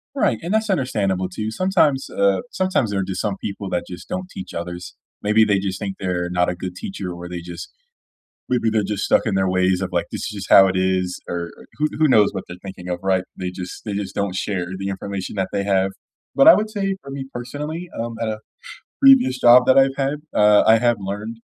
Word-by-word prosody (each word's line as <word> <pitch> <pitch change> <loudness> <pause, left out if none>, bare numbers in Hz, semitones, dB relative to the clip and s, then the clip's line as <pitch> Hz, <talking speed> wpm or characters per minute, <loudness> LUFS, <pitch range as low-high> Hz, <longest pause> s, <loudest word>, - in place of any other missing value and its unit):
Right, 275 - +1
and 175 +4 -3
that's 220 0 +1
understandable 100 - 0
too. 110 +3 -4
Sometimes, 155 - +1
uh, 100 -1 +2
sometimes 185 - 0
there 100 - -1
are - - 0
just 95 0 -3
some 100 -3 -2
people 100 -1 -5
that 90 - -1
just 90 0 -10
don't 185 0 -4
teach 195 -1 -9
others. 90 0 -6 0.3
Maybe 105 +2 +4
they 100 -2 +2
just 95 -1 -3
think 100 -2 -4
they're 90 -2 -2
not 90 0 +1
a 90 - -2
good 90 0 -6
teacher 95 0 -6
or 85 0 -8
they 90 -1 -5
just 85 0 -8 0.8
Maybe 120 -3 +1
they're 110 -1 +1
just 100 0 -2
stuck - - +3
in 110 - 0
their 95 -1 +1
ways 95 0 +2
of 95 - -2
like, 85 -1 0
"This - - -5
is - - -3
just - - -10
how 95 - +9
it 95 0 -1
is," 95 -1 0
er 85 -1 -4
er - - -14
who 150 - +3
who 155 0 +4
knows 105 -6 +5
what - - -5
they're 90 - -9
thinking 95 -2 -9
of, 90 - -2
right? 95 -1 +1 0.2
They 90 -1 -2
just 90 0 -8
they 105 - -3
just 100 -1 -4
don't 100 -2 -2
share 95 -2 -2
the 95 +1 -4
information 100 0 -5
that 95 -1 0
they 100 - -1
have. 95 -1 +2 0.5
But 275 - +5
I 325 - +12
would 215 +1 +1
say 195 -2 -2
for 140 - -11
me 135 -1 -5
personally, 150 +8 -6
um, 115 0 -3
at 115 - -1
a 110 0 -2 0.6
previous 270 - +6
job 125 +1 +7
that 130 - +5
I've 135 0 +4
had, 140 +1 0 0.2
uh, 105 0 +5
I 110 - +7
have 120 -2 +2
learned 105 +4 -5
100 Hz, 235 wpm, -21 LUFS, 95-130 Hz, 0.8 s, I